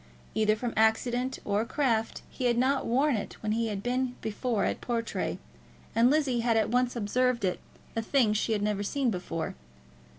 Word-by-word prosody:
Either 215 -1 +3
from 235 +2 -3
accident 245 +4 +2
or 205 +1 +1
craft 230 -3 0
he 255 - -5
had 240 -1 +3
not 265 +2 +2
worn 270 +4 +3
it 205 - -4
when 215 - 0
he 230 +1 +1
had 205 -2 -4
been 250 0 -1
before 220 0 -1
at - - -2
Portray, 230 -5 -2 0.6
and 230 +2 +5
Lizzie 280 -4 +2
had 230 -1 +2
at 220 -1 +1
once 250 0 +2
observed 235 +1 +1
it 180 -1 -1 0.4
as 225 - -1
a - - -17
thing 245 -7 +4
she 215 +1 0
had 205 -1 0
never 210 -1 0
seen 250 +4 0
before. 170 -4 -3
230 Hz, 190 wpm, -29 LUFS, 215-250 Hz, 0.6 s, and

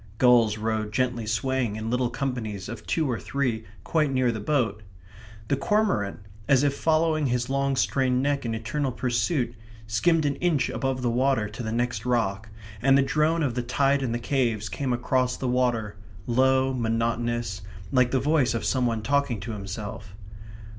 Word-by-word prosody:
Gulls 120 -4 +5
rode 110 -1 -2
gently 120 -1 -1
swaying 120 0 0
in 110 +1 -4
little 125 0 +1
companies 120 -7 -4
of - - -8
two 160 - +1
or 120 -4 -1
three 120 -5 -2 0.2
quite 155 -4 +1
near 130 -2 +2
the 110 - -4
boat; 110 -3 0 0.7
the 140 - +2
cormorant, 140 - 0 0.3
as 135 -1 +4
if 140 -1 +1
following 155 -1 +2
his 125 +1 -1
long 140 0 +1
strained 130 -1 +1
neck 140 +1 0
in 115 -2 -2
eternal 130 +5 -2
pursuit, 125 +1 0 0.3
skimmed 155 +9 +2
an 140 -1 0
inch 160 -5 +1
above 135 -2 -2
the 120 - +1
water 130 -2 +1
to 110 +4 -7
the 110 -2 -3
next 120 +1 -1
rock; 110 -4 -1 0.3
and 135 +2 +5
the 140 - +4
drone 155 +4 +1
of 135 -5 0
the 125 - -1
tide 135 +3 +1
in 130 -3 -1
the 120 - 0
caves 120 -5 -1
came 125 +8 -2
across 125 +1 0
the 130 - -3
water, 120 -4 0 0.3
low, 130 +1 +3
monotonous, 115 -3 -1 0.3
like 125 -2 +4
the 130 - +1
voice 145 -3 +2
of 115 - -2
some 130 -2 +1
one 115 -2 -2
talking 140 -2 +1
to 110 +5 -6
himself. 100 -1 -7
125 Hz, 175 wpm, -26 LUFS, 115-135 Hz, 0.7 s, Gulls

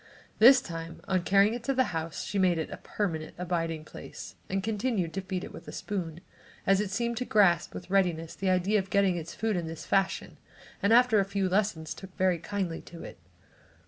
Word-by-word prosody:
This 255 +4 +8
time, 165 -1 -7
on 185 -2 +1
carrying 200 +4 +4
it 240 0 -5
to 275 - 0
the 260 - +4
house 160 0 -3
she 205 - -2
made 180 -3 +3
it 160 - -3
a - - -6
permanent 165 -7 -3
abiding 165 -3 -2
place - - -9 0.2
and 195 0 -1
continued 210 -5 -1
to 195 - -2
feed 185 -1 -4
it - - -8
with - - -11
a - - -6
spoon, 175 -5 -4 0.4
as 195 +1 +4
it 210 - -2
seemed 235 +3 -1
to 250 - -1
grasp 175 -7 +3
with 180 - -8
readiness 175 -4 +1
the 195 - -1
idea 185 +3 +2
of 190 0 -5
getting 200 -3 +3
its 170 -1 -6
food 220 -2 0
in 170 -2 -2
this 160 0 -7
fashion 195 -1 0 0.4
and 200 +1 +2
after 240 -2 +6
a - - +4
few 195 0 -1
lessons, 185 -5 0
took 190 -1 -12
very 185 -2 +2
kindly 185 -2 -3
to 170 - -11
it. - - -10
190 Hz, 210 wpm, -29 LUFS, 170-205 Hz, 0.4 s, This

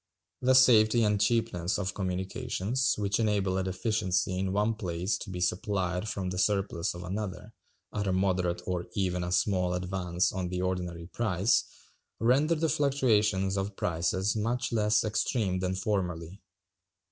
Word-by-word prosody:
The 130 +1 +4
safety 115 -3 +6
and 105 -1 +2
cheapness 110 -7 +1
of 95 -2 -2
communications, 95 +6 -1
which 100 0 0
enable 100 -4 +1
a - - 0
deficiency 95 -1 0
in 95 0 -1
one 105 +3 +1
place 90 -2 -2
to 110 - -8
be 90 -1 -5
supplied 90 +2 -1
from 95 -3 -3
the 90 - -3
surplus 95 -4 0
of 85 - -7
another, 100 +2 -5 0.4
at 105 -1 -2
a - - +1
moderate 90 -2 0
or 90 -1 -3
even 90 -3 0
a 90 - -3
small 90 0 +1
advance 90 -1 -1
on 95 -2 -3
the 90 0 -2
ordinary 90 -2 -3
price, 100 +1 +1 0.5
render 140 +8 +3
the 160 +1 0
fluctuations 110 -10 +2
of 95 +1 -4
prices 95 +5 0
much 120 +3 -1
less 105 -1 +3
extreme 105 -3 0
than 95 0 -1
formerly. 95 -2 -3
95 Hz, 150 wpm, -29 LUFS, 90-110 Hz, 0.5 s, safety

